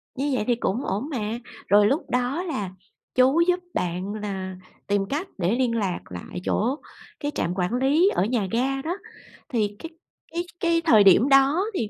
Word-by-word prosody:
Như 280 Hz, +2 st, -1 dB
vậy 250 Hz, -, 0 dB
thì 240 Hz, -, +3 dB
cũng 235 Hz, +2 st, -2 dB
ổn 215 Hz, +11 st, -2 dB
mà. 230 Hz, -4 st, -3 dB, 0.3 s
Rồi 205 Hz, +1 st, +6 dB
lúc 275 Hz, +7 st, -1 dB
đó 250 Hz, +8 st, 0 dB
là 210 Hz, -, -3 dB, 0.5 s
chú 265 Hz, +6 st, +5 dB
giúp 360 Hz, 0 st, +3 dB
bạn 180 Hz, +3 st, -2 dB
là 195 Hz, -3 st, -4 dB, 0.3 s
tìm 200 Hz, -1 st, +1 dB
cách 310 Hz, +7 st, -2 dB
để 185 Hz, +5 st, +1 dB
liên 245 Hz, -2 st, +1 dB
lạc 195 Hz, -6 st, -1 dB
lại 90 Hz, -, -7 dB
chỗ 245 Hz, +6 st, +1 dB, 0.4 s
cái 290 Hz, 0 st, -2 dB
trạm 170 Hz, -, -1 dB
quản 180 Hz, +4 st, -1 dB
lý 285 Hz, +9 st, +3 dB
ở -, -, +2 dB
nhà 220 Hz, -4 st, 0 dB
ga 270 Hz, +3 st, 0 dB
đó, 340 Hz, +6 st, -3 dB, 0.5 s
thì 210 Hz, -5 st, 0 dB
cái 330 Hz, -, -7 dB, 0.4 s
cái 340 Hz, +1 st, -2 dB, 0.2 s
cái 335 Hz, -1 st, +2 dB
thời 220 Hz, -9 st, +7 dB
điểm 200 Hz, +7 st, +6 dB
đó 275 Hz, +6 st, +5 dB
thì 225 Hz, -, -2 dB
240 Hz, 185 wpm, -24 LUFS, 205-285 Hz, 0.5 s, thời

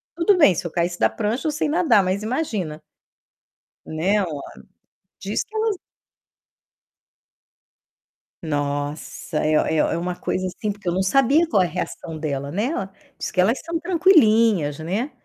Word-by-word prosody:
tudo 355 Hz, +3 st, +3 dB
bem, 245 Hz, -, +6 dB
se 175 Hz, +2 st, -4 dB
eu 165 Hz, -, -4 dB
caísse 175 Hz, 0 st, -1 dB
da -, -, +4 dB
prancha, 225 Hz, +7 st, -2 dB
eu 310 Hz, -, +1 dB
sei 300 Hz, +1 st, -1 dB
nadar, 295 Hz, -, +3 dB
mas 190 Hz, +3 st, -1 dB
imagina. 215 Hz, -, -3 dB, 1.0 s
Né, 185 Hz, +7 st, 0 dB
uma 150 Hz, -5 st, -5 dB, 0.8 s
diz -, -, -2 dB
que 440 Hz, -, -24 dB
elas 435 Hz, -2 st, 0 dB, 2.7 s
Nossa, 145 Hz, +1 st, -3 dB
é 155 Hz, 0 st, +3 dB
o -, -, -2 dB
é 160 Hz, -, +2 dB
o -, -, +1 dB
é -, -, -1 dB
uma 175 Hz, +1 st, -3 dB
coisa 185 Hz, +1 st, -2 dB
assim, 205 Hz, +3 st, -3 dB
porque 200 Hz, -2 st, -10 dB
eu 175 Hz, -, +1 dB
não 190 Hz, -, 0 dB
sabia 275 Hz, -, +4 dB
qual 200 Hz, -, +3 dB
é 180 Hz, -, +3 dB
a -, -, -4 dB
reação 170 Hz, -2 st, -5 dB
dela, 140 Hz, -2 st, -3 dB
né, 205 Hz, +7 st, -1 dB
ela 195 Hz, -, -3 dB, 0.3 s
diz -, -, -4 dB
que 180 Hz, -, +2 dB
elas 225 Hz, +8 st, +2 dB
são 335 Hz, 0 st, -2 dB
tranquilinhas, 230 Hz, -, +4 dB
né. 200 Hz, -, -2 dB
195 Hz, 170 wpm, -22 LUFS, 165-275 Hz, 2.7 s, bem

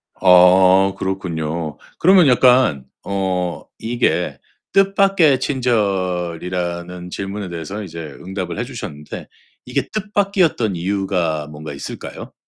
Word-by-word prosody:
아 95 Hz, +1 st, +6 dB
그렇군요. 85 Hz, -5 st, -3 dB, 0.2 s
그러면 180 Hz, -3 st, +6 dB
약간 125 Hz, -, +4 dB, 0.2 s
어 95 Hz, -3 st, -2 dB
이게 120 Hz, +2 st, -1 dB, 0.4 s
뜻밖의 195 Hz, -7 st, +4 dB
친절이라는 90 Hz, -, -2 dB
질문에 100 Hz, 0 st, -5 dB
대해서는 85 Hz, +5 st, -6 dB
이제 85 Hz, -1 st, -9 dB, 0.2 s
응답을 95 Hz, -1 st, -5 dB
해 -, -, 0 dB
주셨는데 100 Hz, -, -8 dB, 0.4 s
이게 -, -, -2 dB
뜻밖이었던 195 Hz, -, 0 dB
이유가 90 Hz, -4 st, -1 dB
뭔가 75 Hz, 0 st, -8 dB
있을까요? 70 Hz, -, -8 dB
95 Hz, 260 characters per minute, -19 LUFS, 85-120 Hz, 0.4 s, 아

